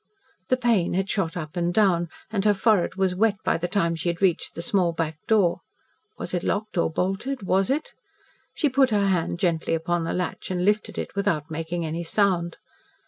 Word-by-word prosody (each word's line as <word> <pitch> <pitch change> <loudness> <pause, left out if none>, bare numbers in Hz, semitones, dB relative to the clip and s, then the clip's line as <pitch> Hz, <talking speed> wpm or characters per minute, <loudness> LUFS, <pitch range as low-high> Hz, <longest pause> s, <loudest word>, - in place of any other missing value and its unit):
The 255 - +3
pain 230 -9 +2
had 190 +1 0
shot 180 -4 -1
up 155 0 -6
and 175 0 0
down, 175 -4 +2 0.2
and 200 -3 0
her 210 -1 +4
forehead 195 -3 +2
was 190 -1 +1
wet 205 +2 +2
by - - +2
the 175 +1 -2
time 175 -3 +1
she 165 +1 -2
had 170 0 -3
reached 190 -4 +1
the 170 - -4
small 180 -4 +1
back 160 -1 -3
door. 200 -6 +3 0.6
Was - - -6
it 180 - 0
locked 215 +4 -2
or 170 - +2
bolted 195 - -2
was 190 +2 +2
it? 290 +4 -1 0.6
She 305 - +2
put 265 -1 +3
her 205 -3 +2
hand 170 -2 0
gently 170 -3 0
upon 165 +1 -1
the 165 - -2
latch 180 0 -3
and 180 -1 -1
lifted 210 +1 +1
it - - -4
without 170 -6 -1
making 165 +2 -3
any 165 +2 -3
sound. 175 -2 +1
180 Hz, 200 wpm, -25 LUFS, 170-205 Hz, 0.6 s, her